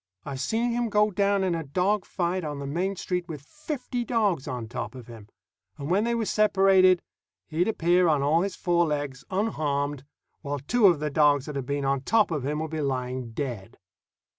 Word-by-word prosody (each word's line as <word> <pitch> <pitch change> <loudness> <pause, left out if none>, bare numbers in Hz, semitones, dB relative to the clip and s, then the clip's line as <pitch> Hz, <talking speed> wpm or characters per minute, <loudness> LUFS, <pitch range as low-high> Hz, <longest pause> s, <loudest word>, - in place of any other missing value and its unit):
I've 135 -2 -5
seen 230 - 0
him 240 0 -1
go 210 0 +3
down 200 0 +1
in 185 -2 +1
a 165 -1 -2
dog 185 +7 0
fight 180 0 -2
on 150 -2 -4
the 140 - -5
main 180 +8 -1
street 180 -1 -3
with 150 -4 -7
fifty 265 - -5
dogs 210 - 0
on 125 -4 -4
top 115 0 -5
of 125 -2 -9
him, 115 -3 -12 0.5
and 145 +3 -5
when 200 +4 +3
they 235 0 0
were 230 -1 -1
separated, 195 -3 +4 0.4
he'd 165 +3 0
appear 180 -3 +3
on 150 -3 +2
all 155 +4 +3
his 195 0 -2
four 175 -1 +1
legs, 145 -3 -3
unharmed, 145 - -1 0.4
while 145 -1 -3
two 205 - +3
of 170 -5 +4
the 150 -1 -1
dogs 145 -2 +3
that 150 - -6
had 135 -2 -4
been 140 0 -1
on 135 -1 +1
top 215 +7 +2
of 150 -5 -2
him 145 +3 -2
would 160 -1 -4
be 160 -1 -2
lying 125 -3 -3
dead. 115 -5 -5
160 Hz, 205 wpm, -26 LUFS, 140-195 Hz, 0.5 s, separated